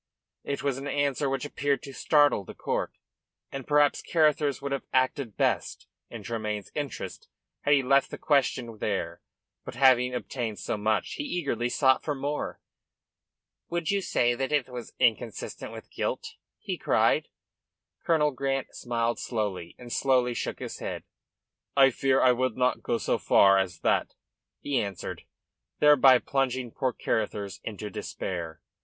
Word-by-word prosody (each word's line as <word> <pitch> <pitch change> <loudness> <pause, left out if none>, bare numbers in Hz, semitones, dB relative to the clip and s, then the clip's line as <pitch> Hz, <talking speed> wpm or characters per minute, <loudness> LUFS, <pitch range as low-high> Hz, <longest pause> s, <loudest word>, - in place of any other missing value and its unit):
It 140 - -3
was 135 -2 0
an 140 - -6
answer 140 -1 0
which 135 +1 -2
appeared 145 -1 -1
to 140 - -8
startle 145 -7 +3
the - - -11
court, - - -2 0.6
and 135 -2 -6
perhaps 145 -1 +3
Carruthers 150 -3 +2
would 140 0 -5
have 140 - -3
acted 130 -3 0
best - - 0 0.2
in 115 -3 -8
Tremayne's 105 -2 -4
interest 145 -2 -5 0.3
had 145 - +4
he 135 - +2
left 135 +1 +3
the - - -7
question 125 -6 0
there. 100 -2 -2 0.4
But - - -8
having 125 -1 +4
obtained 120 -3 -4
so 85 - -3
much 110 0 0
he - - -2
eagerly 140 - -1
sought 130 0 +3
for 150 - -2
more. 145 +2 -3 1.1
"Would 170 0 -1
you 200 0 +1
say 120 -9 +2
that 135 +3 -2
it 145 -4 +1
was 125 -2 -8
inconsistent 115 -2 -1
with - - -10
guilt?" - - -3 0.2
he - - -5
cried. - - +2 0.8
Colonel 150 -3 +3
Grant 135 0 -2
smiled 120 -1 -1
slowly, 100 -7 -3
and 120 -1 -8
slowly 125 -2 +2
shook - - -3
his - - -7
head. - - -5 0.7
"I 135 -1 +7
fear 135 +1 +2
I 125 -1 +6
could 130 -1 -1
not 125 0 +1
go 120 - 0
so - - 0
far, 95 0 +5
as 90 -2 -3
that," - - +1 0.5
he 140 -3 0
answered, 100 -3 -6 0.5
thereby 140 -3 +7
plunging 130 -2 -1
poor 130 +1 -1
Carruthers 100 -5 -2
into 105 -1 -6
despair. 85 -5 -5
130 Hz, 155 wpm, -27 LUFS, 115-140 Hz, 1.1 s, I